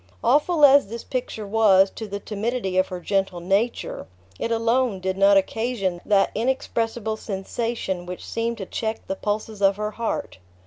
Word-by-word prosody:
Awful 300 +2 +4
as 280 -5 +6
this 230 +3 -7
picture 245 -4 -4
was 200 -2 +4
to 220 - -7
the 200 0 -5
timidity 210 -1 -3
of 185 - +2
her 180 - -6
gentle 195 0 -1
nature, 200 +7 -1 0.3
it 230 - -2
alone 230 -1 +1
did 190 0 -2
not 200 +1 +5
occasion 195 -3 -1
that 200 -2 +3
inexpressible 225 -2 -1
sensation 195 -2 -3
which 180 0 -7
seemed 230 0 -2
to 195 - -5
check 220 +3 -4
the 195 - -3
pulses 210 +1 -3
of 195 0 +4
her 210 +1 -3
heart. 225 - -4
215 Hz, 165 wpm, -24 LUFS, 195-230 Hz, 0.3 s, as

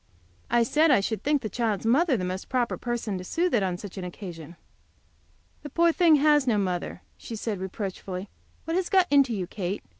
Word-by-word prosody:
I 240 0 +4
said 300 +7 +3
I 260 - +5
should 215 +2 -2
think 290 -2 +1
the - - -1
child's 220 -1 -2
mother 270 +4 +3
the 185 - -2
most 185 +1 -5
proper 250 -2 0
person 235 -5 -3
to - - -7
soothe 345 - -1
it 235 - +3
on 185 -2 -1
such 195 0 -8
an - - -5
occasion. 175 -3 -8 1.1
"The 290 - -8
poor 340 +4 +3
thing 330 -2 +5
has 295 -1 +4
no 225 -4 +3
mother," 180 -3 -2
she 230 - -8
said, 215 -2 -3
reproachfully. 190 0 -5 0.4
"What 325 +1 -2
has 365 -1 0
got 380 -2 +4
into 275 -5 +4
you, 190 -3 -2
Kate? 190 +1 -4
225 Hz, 205 wpm, -26 LUFS, 190-290 Hz, 1.1 s, I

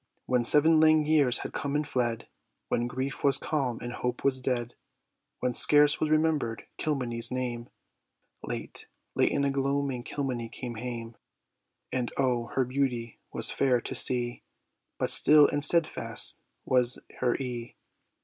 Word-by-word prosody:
When 125 -1 0
seven 155 +6 +4
lang 155 -1 +4
years 150 -5 +2
had - - -7
come 140 0 -3
and 150 0 -1
fled, 120 -4 -2 0.4
When 120 - -1
grief 130 +2 -5
was 140 -1 +4
calm 135 -6 -3
and 120 +1 -6
hope 125 0 -4
was 130 -1 +1
dead; 120 -2 -3 0.7
When 125 - -1
scarce 150 +3 +5
was 155 - -1
remembered 155 -8 0
Kilmeny's 125 -6 -2
name, 125 -2 -5 0.7
Late, - - -7 0.3
late - - +1
in 140 - 0
a 140 - 0
gloaming 140 -1 -2
Kilmeny 125 -5 -4
came 120 +1 -7
hame! 115 -1 -7 0.7
And 125 -2 -3
O, 125 -3 0
her 130 - +1
beauty 125 -3 -3
was - - 0
fair 130 -3 +1
to - - -6
see, 120 -1 +3 0.6
But - - -1
still 150 -1 +7
and 145 - -2
steadfast 165 +1 +3 0.2
was 125 -1 +2 0.2
her 125 -1 0
ee! 120 -3 -6
130 Hz, 150 wpm, -27 LUFS, 120-140 Hz, 0.7 s, still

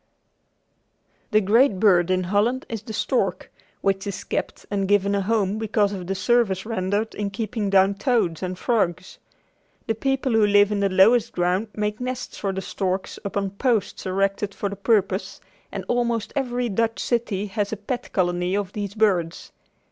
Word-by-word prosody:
The 215 -2 +4
great 215 +1 +3
bird 185 -4 +4
in 185 0 +1
Holland 210 +8 +1
is 225 -3 -5
the 220 - -9
stork, 215 - -1 0.3
which 195 +1 0
is 200 - -4
kept - - -4
and 195 -1 0
given 200 0 +2
a 200 - +1
home 210 0 0
because 210 -2 +1
of 180 -3 -6
the 195 - -1
service 210 -3 +1
rendered 210 0 -1
in 205 -1 -3
keeping 210 0 -3
down 195 0 +4
toads 200 - 0
and 185 -1 -3
frogs. 185 -5 -1 0.7
The 225 - 0
people 270 +3 -1
who 220 -2 +4
live 205 0 +5
in 205 - 0
the 200 -1 +2
lowest 205 +5 +4
ground 180 +4 0
make 210 +1 -2
nests 255 0 -4
for 195 - -1
the 190 0 -4
storks 190 0 -3
upon 200 0 -2
posts 220 -2 -1
erected 195 +1 -1
for 200 - -2
the 200 - -6
purpose, 200 -1 0 0.3
and - - -5
almost 235 -2 0
every 250 -3 -1
Dutch 230 +2 0
city 225 -5 -1
has 205 0 -2
a 220 - -3
pet 245 +5 -5
colony 180 0 0
of 200 -2 -3
these 205 -1 -4
birds. 185 -6 0
205 Hz, 170 wpm, -23 LUFS, 190-225 Hz, 0.7 s, live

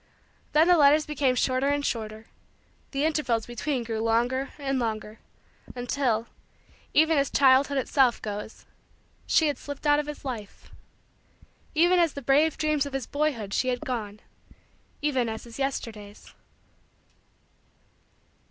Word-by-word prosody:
Then 315 +2 +5
the 355 -2 +5
letters 295 +1 +5
became 280 -4 0
shorter 255 +2 +1
and 285 0 0
shorter; 220 -1 -4 0.6
the 275 +1 -1
intervals 270 -8 0
between 245 +2 -3
grew 225 -1 -4
longer 240 +4 +1
and 270 -2 -1
longer; 215 -2 -4 0.6
until, 245 -2 -1 0.7
even 315 0 +4
as 280 - 0
childhood 275 +1 +4
itself 260 -1 +2
goes, 210 +1 -7 0.6
she 320 - +4
had 290 -2 -1
slipped 285 +1 -8
out 290 0 +4
of 295 - -3
his 295 -1 -8
life. 225 -6 -7 1.0
Even 350 +3 +4
as 335 -4 +2
the 280 - -7
brave 290 +4 +3
dreams 305 -2 +1
of 280 - -9
his 270 -3 -3
boyhood 275 -9 -2
she 255 - 0
had 245 -1 -1
gone 220 -7 -5 0.8
even 260 -6 +1
as 220 0 -6
his 235 +2 -11
Yesterdays. 220 -6 -5
270 Hz, 135 wpm, -26 LUFS, 230-290 Hz, 1.0 s, Then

